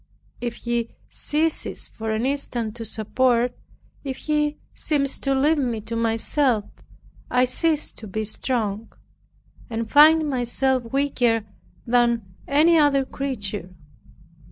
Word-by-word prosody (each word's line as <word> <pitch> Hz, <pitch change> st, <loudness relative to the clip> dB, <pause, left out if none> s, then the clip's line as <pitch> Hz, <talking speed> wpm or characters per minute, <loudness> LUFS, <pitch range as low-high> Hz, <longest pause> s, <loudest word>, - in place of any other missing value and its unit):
If 240 Hz, -1 st, -3 dB
He 235 Hz, -1 st, -3 dB
ceases 310 Hz, +2 st, -2 dB
for 220 Hz, 0 st, -6 dB
an 220 Hz, +2 st, 0 dB
instant 245 Hz, -5 st, -2 dB
to 230 Hz, -, -6 dB
support, 240 Hz, +3 st, +1 dB, 0.5 s
if 265 Hz, -2 st, -4 dB
He 300 Hz, -1 st, 0 dB, 0.2 s
seems 280 Hz, -3 st, 0 dB
to 275 Hz, -1 st, 0 dB
leave 295 Hz, +3 st, +3 dB
me 240 Hz, -5 st, -1 dB
to 225 Hz, +2 st, -5 dB
myself, 230 Hz, +1 st, +1 dB, 0.6 s
I 250 Hz, 0 st, +3 dB
cease 300 Hz, +4 st, +1 dB
to 220 Hz, -, -10 dB
be 215 Hz, +3 st, -3 dB
strong, 220 Hz, -1 st, -2 dB, 0.8 s
and 225 Hz, -1 st, -3 dB
find 310 Hz, +2 st, +7 dB
myself 255 Hz, -1 st, 0 dB
weaker 245 Hz, -5 st, +1 dB, 0.4 s
than 235 Hz, -5 st, +1 dB
any 315 Hz, +4 st, +5 dB
other 280 Hz, -2 st, +3 dB
creature. 205 Hz, -10 st, -4 dB
245 Hz, 120 wpm, -23 LUFS, 225-280 Hz, 0.8 s, find